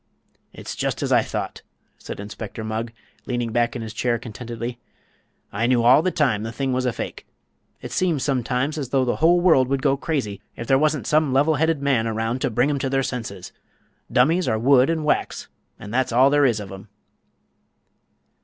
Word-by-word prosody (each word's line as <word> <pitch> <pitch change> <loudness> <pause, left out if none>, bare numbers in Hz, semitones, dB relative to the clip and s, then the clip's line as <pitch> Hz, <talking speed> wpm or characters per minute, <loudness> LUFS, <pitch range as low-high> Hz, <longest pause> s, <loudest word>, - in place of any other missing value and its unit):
"It's - - -8
just - - -2
as - - -2
I - - +5
thought," - - -5 0.4
said - - -8
Inspector 105 +2 -7
Mugg, 110 +1 -3 0.4
leaning 120 -2 -2
back 120 +1 +1
in 120 - -4
his 110 -1 -7
chair 120 -1 0
contentedly. 120 +1 -7 0.7
"I 110 +4 0
knew 120 -2 +3
all 125 +5 +6
the 185 - +1
time 140 - +1
the 110 +1 -4
thing 130 +3 -2
was 130 0 0
a - - +2
fake. 115 - -7 0.6
It - - -7
seems 170 -7 0
sometimes 130 +2 -1
as 135 -4 -4
though 130 -1 +2
the 120 - -1
whole 170 +2 +4
world 160 -8 +4
would 135 0 -1
go 135 -2 +3
crazy 135 - -3
if 115 - -6
there 135 +2 +3
wasn't 155 -1 +1
some 155 -3 +2
level 145 +4 +3
headed 160 -1 0
man 130 -5 +2
around 115 +3 -2
to - - +1
bring 125 +6 +1
'em 140 - -1
to 135 - -1
their 135 0 +1
senses. 110 -8 -5 0.6
Dummies 160 +8 +3
are 110 - +1
wood 130 +3 +4
an' 165 -2 -1
wax, 150 - -1 0.3
an' 105 - -9
that's 130 +1 0
all 130 +4 +5
there 145 -1 +4
is 115 -3 0
of 100 -2 -8
'em." 95 +2 -10
125 Hz, 200 wpm, -23 LUFS, 115-140 Hz, 0.7 s, all